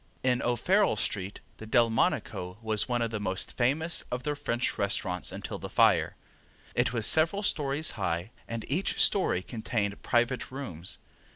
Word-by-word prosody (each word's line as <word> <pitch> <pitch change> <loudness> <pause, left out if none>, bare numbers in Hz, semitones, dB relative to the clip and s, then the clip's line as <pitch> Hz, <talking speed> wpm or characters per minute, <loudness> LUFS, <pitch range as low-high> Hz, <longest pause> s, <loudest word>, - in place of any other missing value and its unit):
In 125 -1 +2
O'Farrell 120 - +2
street 100 -1 -3 0.2
the 110 - -9
Delmonico 110 -5 +1
was 110 +1 +1
one 120 -1 +1
of 115 - -2
the 110 - -2
most 95 -2 -3
famous 150 +7 +1
of 125 0 -3
the 150 - 0
French 120 -4 -1
restaurants 95 -3 -1
until - - -6
the - - -6
fire. - - +3 0.6
It 125 -1 +2
was 115 -3 -1
several 165 +6 +4
stories 150 -3 +1
high, 90 -2 -2 0.2
and 115 -1 -4
each 170 +8 -1
story 185 - +3
contained 105 -3 -3
private 120 +1 +1
rooms. 120 - -4
120 Hz, 155 wpm, -29 LUFS, 105-135 Hz, 0.6 s, several